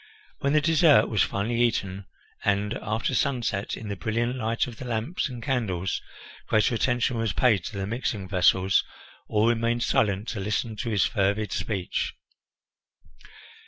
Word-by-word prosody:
When 140 -1 0
the 150 - +4
dessert 160 -1 +5
was 110 - +1
finally 115 +4 0
eaten, 100 -5 0 0.4
and 105 +1 +1
after 110 +1 -1
sunset, 120 -7 -1
in 110 - -7
the 100 - -3
brilliant 115 +6 -1
light 115 -2 0
of 120 -3 -9
the 130 - -7
lamps 120 +8 -2
and 120 -2 -7
candles, 100 - -1 0.5
greater 110 +3 +3
attention 120 0 +1
was 115 -2 0
paid 110 -8 +3
to 105 - -6
the 95 - -2
mixing 105 -3 -3
vessels, 95 0 +3 0.4
all 105 +1 +2
remained 120 0 +1
silent 100 0 +1
to 110 - -4
listen 105 +3 -2
to 120 - -3
his 105 -4 +2
fervid 100 -1 0
speech. 95 -3 -2
110 Hz, 155 wpm, -26 LUFS, 100-120 Hz, 0.5 s, dessert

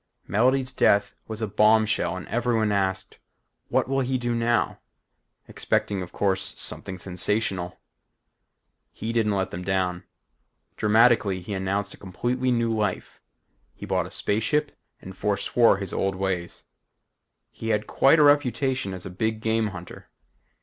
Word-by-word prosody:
Melody's 130 +5 +2
death 100 -4 +2
was 110 0 -5
a - - 0
bombshell 105 -3 +2
and 95 - -8
everyone 115 -2 0
asked. 95 -1 -2 0.5
What - - +1
will 135 +1 0
he 130 0 0
do 120 -1 -2
now? 120 0 0 0.7
expecting 100 -2 -1
of 90 -1 -7
course, 95 -1 -1
something 95 - -3
sensational. 95 0 -1 1.1
He 115 +1 -5
didn't 110 -3 +1
let 95 -1 -1
them 90 - -6
down. 90 -2 -1 0.7
Dramatically, 110 -3 +3
he 100 +4 -6
announced 100 +1 -2
a - - -13
completely 120 +7 -2
new 115 -2 +1
life. 105 -4 -3 0.5
He - - -8
bought - - -1
a - - -11
space 105 +2 0
ship 150 +5 0 0.3
and 95 0 -9
foreswore 105 +2 +2
his 100 -3 -5
old 95 0 0
ways. 95 -2 -3 0.9
He 115 - -6
had 105 -1 +1
quite 140 +4 +4
a 150 - +5
reputation 130 -7 +2
as 90 - -7
a - - -6
big 110 +4 -2
game 110 0 0
hunter. 90 -3 -10
105 Hz, 145 wpm, -25 LUFS, 95-115 Hz, 1.1 s, a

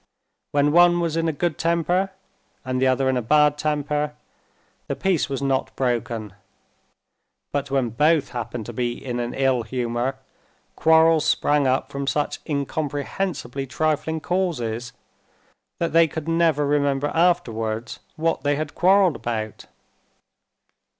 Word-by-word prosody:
When 145 0 +3
one 175 +1 +5
was 165 -2 -1
in 165 0 0
a - - +2
good 160 +1 -2
temper, 170 +3 +1 0.6
and 130 0 -1
the 130 - +4
other 130 +1 +2
in 130 -1 +2
a - - 0
bad 150 +5 +4
temper, 150 0 -1 0.7
the - - -2
peace 190 -7 0
was 135 0 -3
not 135 -1 -1
broken; 115 -5 -2 1.2
but 140 -1 -2
when 135 -3 +1
both 150 +5 +2
happened 120 -2 -5
to 120 - -7
be 120 +1 -1
in 120 -2 -3
an 120 0 -3
ill 135 -2 +2
humor, 120 +2 -2 0.6
quarrels 160 -1 +4
sprang 145 -3 +2
up 130 +1 0
from 140 0 -4
such 145 +1 -1
incomprehensibly 145 -1 -3
trifling 155 +2 -1
causes, 120 -12 -2 0.9
that 170 -2 -2
they 165 0 +6
could 160 0 -6
never 165 -3 +2
remember 145 0 +1
afterwards 115 -10 0 0.2
what 165 -1 0
they 145 +1 +1
had 150 0 -4
quarreled 185 -2 +4
about. 110 -3 -4
145 Hz, 135 wpm, -23 LUFS, 125-160 Hz, 1.2 s, they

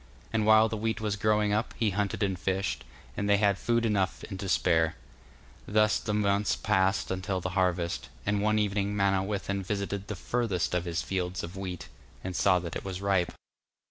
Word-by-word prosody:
And 110 -1 +1
while 110 0 +7
the 110 0 -3
wheat 110 +1 -1
was 105 -2 -1
growing 105 0 +2
up, 110 +3 -1
he 110 -3 +1
hunted 100 +2 -1
and 95 -2 -1
fished, 95 +1 -1 0.3
and 100 0 -1
they 100 - +5
had 100 -1 +2
food 115 -1 +1
enough 100 -4 0
and 95 - -5
to 95 - -4
spare. 80 -3 +2 0.7
Thus 105 +1 +3
the 105 -1 -2
months 100 0 +2
passed 95 -3 +1
until 95 0 -2
the 90 - -3
harvest; 90 -2 0 0.2
and 105 0 +1
one 110 +1 +2
evening 100 -1 0
Manawyddan 100 0 0
visited 100 0 -3
the 105 - -4
furthest 105 -5 -1
of 90 0 0
his 85 0 -2
fields 90 -1 -2
of 85 +3 -7
wheat; 95 -3 -5 0.4
and 95 -1 -4
saw 90 - +4
that 85 -1 -5
it - - -4
was 95 -2 -5
ripe. 95 -3 +1
100 Hz, 190 wpm, -29 LUFS, 95-105 Hz, 0.7 s, while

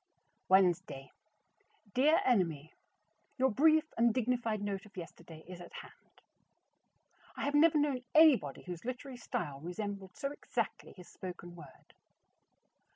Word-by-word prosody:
Wednesday. 175 -8 +2 0.8
Dear 295 +6 +4
Enemy: 165 - +1 0.6
Your 265 0 +3
brief 310 +6 +4
and 235 0 +4
dignified 235 -2 0
note 200 +1 -4
of 205 - -20
yesterday 165 -2 -10
is 180 -1 -9
at 175 - -12
hand. - - -13 1.2
I - - -3
have 285 - -1
never 310 +1 +5
known 285 -4 0
anybody 290 - +5
whose 180 -2 -7
literary 255 +1 -6
style 140 - -4
resembled 190 +3 -6
so 275 - -3
exactly 290 - -4
his 180 - -12
spoken 175 -1 -9
word. 170 - -15
205 Hz, 125 wpm, -33 LUFS, 175-260 Hz, 1.2 s, never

